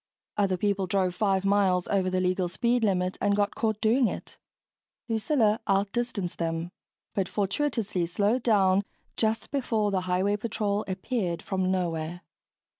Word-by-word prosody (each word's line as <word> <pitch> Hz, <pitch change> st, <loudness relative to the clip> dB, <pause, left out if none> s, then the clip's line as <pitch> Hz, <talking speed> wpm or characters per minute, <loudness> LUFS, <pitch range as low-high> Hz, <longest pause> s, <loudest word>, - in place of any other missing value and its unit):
Other 195 Hz, -3 st, +1 dB
people 200 Hz, 0 st, 0 dB
drove 185 Hz, -1 st, +1 dB
five 195 Hz, -1 st, +1 dB
miles 195 Hz, -3 st, +2 dB
over 190 Hz, -2 st, +1 dB
the 185 Hz, 0 st, 0 dB
legal 185 Hz, 0 st, 0 dB
speed 235 Hz, +6 st, +1 dB
limit 185 Hz, -3 st, +1 dB
and 205 Hz, 0 st, +3 dB
got 205 Hz, 0 st, +1 dB
caught 220 Hz, -2 st, -1 dB
doing 235 Hz, +3 st, +4 dB
it -, -, -7 dB, 0.7 s
Lucilla 225 Hz, -1 st, +2 dB
out 195 Hz, +1 st, +2 dB
distanced 230 Hz, -7 st, -3 dB
them, 165 Hz, +1 st, -2 dB, 0.4 s
but 190 Hz, -3 st, -1 dB
fortuitously 205 Hz, -4 st, -1 dB
slowed 205 Hz, +8 st, +1 dB
down 195 Hz, -4 st, +4 dB, 0.3 s
just 220 Hz, 0 st, 0 dB
before 225 Hz, -7 st, 0 dB
the 190 Hz, -1 st, +1 dB
highway 185 Hz, +3 st, +1 dB
patrol 210 Hz, -1 st, -1 dB
appeared 185 Hz, -2 st, -2 dB
from 190 Hz, -1 st, -1 dB
nowhere. 175 Hz, -2 st, -2 dB
200 Hz, 145 wpm, -27 LUFS, 185-215 Hz, 0.7 s, doing